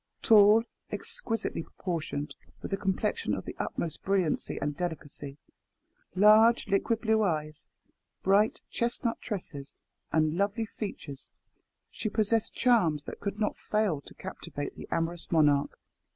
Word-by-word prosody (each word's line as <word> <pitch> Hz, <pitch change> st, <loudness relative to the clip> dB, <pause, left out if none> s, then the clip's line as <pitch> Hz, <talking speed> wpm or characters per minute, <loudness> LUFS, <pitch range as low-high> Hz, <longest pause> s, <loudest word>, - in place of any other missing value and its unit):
Tall, 215 Hz, +1 st, +7 dB, 0.3 s
exquisitely 460 Hz, -, -2 dB
proportioned, 155 Hz, -4 st, -4 dB, 0.3 s
with -, -, -4 dB
a -, -, +4 dB
complexion 195 Hz, +2 st, -1 dB
of -, -, -6 dB
the -, -, -6 dB
utmost 165 Hz, -, -3 dB
brilliancy 190 Hz, -5 st, 0 dB
and 145 Hz, 0 st, -2 dB
delicacy, 145 Hz, -4 st, -5 dB, 0.8 s
large 215 Hz, +4 st, +6 dB
liquid 220 Hz, +3 st, +1 dB
blue 220 Hz, -1 st, +2 dB
eyes, 155 Hz, -6 st, -2 dB, 0.6 s
bright 200 Hz, +3 st, +3 dB
chestnut 235 Hz, 0 st, -1 dB
tresses, 165 Hz, -, -6 dB, 0.4 s
and 155 Hz, +1 st, +2 dB
lovely 205 Hz, +3 st, 0 dB
features, 190 Hz, -10 st, -7 dB, 0.6 s
she 215 Hz, -, -3 dB
possessed 215 Hz, +1 st, 0 dB
charms 175 Hz, -, +3 dB
that -, -, -8 dB
could 200 Hz, +1 st, -4 dB
not 210 Hz, -, 0 dB
fall 210 Hz, -9 st, 0 dB
to -, -, -15 dB
captivate 170 Hz, -6 st, -6 dB
the -, -, -9 dB
amorous 165 Hz, +1 st, -2 dB
monarch. 145 Hz, -4 st, +3 dB
195 Hz, 125 wpm, -29 LUFS, 155-215 Hz, 0.8 s, Tall